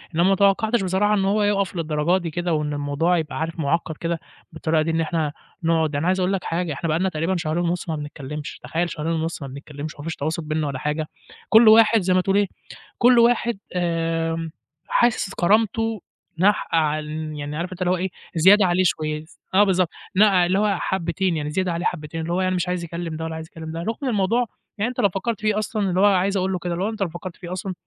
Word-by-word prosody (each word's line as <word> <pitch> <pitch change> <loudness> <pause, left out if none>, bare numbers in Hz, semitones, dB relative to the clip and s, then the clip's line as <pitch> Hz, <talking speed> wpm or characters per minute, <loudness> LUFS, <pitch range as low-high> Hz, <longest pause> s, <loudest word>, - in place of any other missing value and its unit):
إنما 170 - +3
ما 195 - +4
توقّعتش 200 +3 +2
بصراحة 190 +3 +2
إن 195 -2 +2
هو 205 +2 +2
يوقف 200 -2 +1
للدرجة 160 +1 +1
دي 165 - -4
كده 175 +1 -1
وإن 150 -1 -1
الموضوع 145 +5 +1
يبقى 160 -2 -3
عارف 165 +1 -3
مُعقّد 160 +1 -1
كده 170 -1 -2 0.3
بالطريقة 160 0 0
دي 165 +1 0
إن 165 - +1
إحنا 160 -2 -1 0.3
نقعد 160 -2 +1
أنا 145 +4 0
عايز 185 +1 +2
أقول 185 +2 +1
لك 190 - -2
حاجة، 165 -1 -2
إحنا 140 +4 -4
بقى 155 +2 +1
لنا 190 - +1
تقريبًا 165 +2 -1
شهرين 170 +1 -1
ونُص 175 0 -2
ما 160 - 0
بنتكلّمش. 150 0 -7
تخيل 170 +1 -1
شهرين 155 +1 -3
ونُص 165 0 -2
ما 140 - -5
بنتكلّمش 145 +2 -8
وما 145 - -10
فيش 165 0 -4
تواصل 160 +3 -3
بيننا 155 0 -1
ولا 135 -2 -4
حاجة. 150 +2 -2 0.4
كل 225 +1 +7
واحد 220 0 +7
زي 185 0 +1
ما 185 - +4
تقول 195 +2 +1
إيه، 205 -1 +3 0.5
كل 245 0 +6
واحد 235 -2 +3 0.2
آمم 165 -1 -1 0.4
حاسس 240 - +1
كرامته 220 +3 +1 0.4
ناقحة 190 -2 +2
عل 155 -1 0 0.3
يعني 145 +1 -5
عارف 175 +3 -3
أنت 185 - -9
اللي 180 0 +2
هو 185 - +2
إيه، 190 +2 -2 0.3
زيادة 190 +5 +6
عليه 180 +1 +2
شوية 155 -2 -1
س - - -22
آه 200 +2 +6
بالضبط. 185 -3 +2 0.3
نقع 195 -3 +5
اللي 185 +3 +1
هو 205 -3 +2
حبّتين، 175 -1 -1
يعني 150 -1 -3
زيادة 185 +3 -1
عليه 170 +1 -3
حبّتين 165 -1 -3
اللي 170 +2 -3
هو 185 - +1
يعني 185 0 +1
مش 180 0 -1
عايز 180 -1 -2
يكلّم 170 -1 -5
ده 160 - -4
ولا 160 0 -4
عايز 160 0 -7
يكلّم 160 -1 -8
ده. 165 - -5
رغم 230 +6 -2
الموضوع 225 +3 +1 0.3
يعني 215 +4 0
أنت 250 - -7
لو 200 - +4
فكّرت 205 +4 -3
فيه 215 -1 +1
أصلًا 215 -2 -1
اللي 180 0 0
هو 200 - +5
عايز 195 0 +3
أقول 190 0 0
له 185 - -2
كده 175 0 -3
اللي 175 +3 -2
هو - - 0
أنت 220 -1 -7
لو 190 - +1
فكّرت 175 +2 -8
فيه 175 -2 -9
أصلًا، 185 +1 -4
175 Hz, 235 wpm, -23 LUFS, 160-195 Hz, 0.5 s, كل